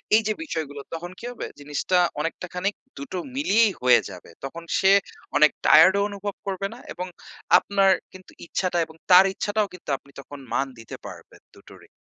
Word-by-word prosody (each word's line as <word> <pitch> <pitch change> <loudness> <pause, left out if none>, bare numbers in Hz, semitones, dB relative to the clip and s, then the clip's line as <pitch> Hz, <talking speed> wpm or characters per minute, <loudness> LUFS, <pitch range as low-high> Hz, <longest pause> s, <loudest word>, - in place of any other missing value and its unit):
এই 220 - +5
যে 215 - +1
বিষয়গুলো 155 - -5
তখন 175 +2 -6
কি - - -9
হবে 245 - -6 0.2
জিনিসটা 150 +5 -1 0.2
অনেকটা 165 +4 -3
খানিক 190 +3 -1 0.2
২ - - -6
টো - - -2 0.2
মিলিয়েই 230 -6 +3
হয়ে 125 -1 +6
যাবে। 90 -3 -12
তখন 165 +5 -7 0.2
সে 190 - +5 0.5
অনেক 155 0 +6
টায়ার্ড‌ 165 +5 +7
ও - - +2
অনুভব 200 0 -5
করবে 195 0 -2
না 240 - -12
এবং 180 +2 -5 0.5
আপনার 195 -1 +3 0.2
কিন্তু 185 0 -14
ইচ্ছাটা 180 +1 -1
এবং 160 0 -16 0.2
তার 185 +2 +9
ইচ্ছাটাও 205 +1 -1
কিন্তু 180 - -12
আপনি 140 - -22
তখন 140 +1 -10
মান 135 - +1
দিতে 115 - -9
পারবেন, - - -12
২ - - -16
টোরই। - - -15
180 Hz, 185 wpm, -24 LUFS, 150-200 Hz, 0.5 s, তার